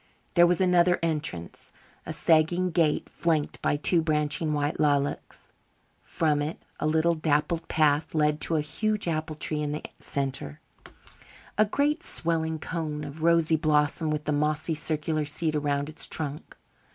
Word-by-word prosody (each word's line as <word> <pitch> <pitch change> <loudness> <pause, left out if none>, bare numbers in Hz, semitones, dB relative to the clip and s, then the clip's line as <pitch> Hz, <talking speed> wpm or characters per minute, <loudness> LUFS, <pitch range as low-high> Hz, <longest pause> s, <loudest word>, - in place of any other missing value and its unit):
There 175 0 +6
was 175 0 +2
another 180 -1 +4
entrance 150 - -3 0.4
a - - -3
sagging 175 +3 +2
gate 160 -2 +1
flanked 160 -3 -1
by - - +1
two 165 +3 +2
branching 150 0 0
white 145 0 -1
lilacs. 145 -1 -1 0.5
From 155 -3 0
it 150 +3 -3 0.2
a 155 - 0
little 160 +2 +2
dappled 160 +1 0
path 155 0 +1
led 150 0 +2
to 165 - +1
a 155 - +2
huge 210 +8 -2
apple 155 -1 -2
tree 150 0 -2
in 150 -1 -2
the 150 - -5 0.2
centre, 135 - -3 1.0
a 215 - +4
great 290 +9 0
swelling 160 - 0
cone 155 -2 -4
of 145 +2 -8
rosy 165 -1 +3
blossom 155 0 +1
with 150 -1 -3
a - - +1
mossy 150 +2 0
circular 155 0 -1
seat 155 +2 -1
around 145 -1 -1
its 155 +1 -4
trunk. 150 -1 -4
155 Hz, 150 wpm, -27 LUFS, 150-165 Hz, 1.0 s, There